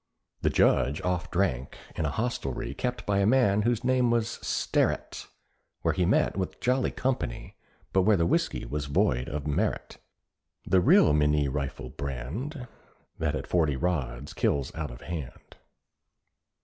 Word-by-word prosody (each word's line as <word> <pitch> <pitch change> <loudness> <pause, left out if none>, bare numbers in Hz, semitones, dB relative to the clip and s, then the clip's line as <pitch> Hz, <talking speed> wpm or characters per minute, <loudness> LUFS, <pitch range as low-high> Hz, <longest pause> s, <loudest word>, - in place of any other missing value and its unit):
The - - +2
Judge 70 +4 +3
oft 90 0 -1
drank 85 -9 -1 0.2
in 80 - -1
a - - +1
hostelrie 95 - -3
Kept 125 -3 -3
by 100 -1 +1
a 100 - +3
man 110 -4 +4
whose 120 +2 0
name 130 -1 +3
was 115 -1 0
Sterret, - - -1 0.6
Where - - +2
he 90 -2 +1
met 105 - +2
with 95 -2 -3
jolly 125 +1 +1
company, 125 - -3 0.4
But 95 - +4
where 105 +2 +4
the 85 - +2
whisky 85 - 0
was 70 +4 -3
void 65 -3 +1
of 75 -1 -4
merit. 75 -1 -2 0.7
The 95 - +3
real 75 - +6
Minié 75 -2 +2
rifle 70 -3 -4
brand, 85 - -5 0.5
That 75 -2 0
at - - -4
forty 80 -5 +1
rods 70 -5 -2
kills 70 -3 0
out 80 -2 -4
of - - -11
hand. 80 -7 -7
85 Hz, 150 wpm, -28 LUFS, 70-110 Hz, 0.7 s, real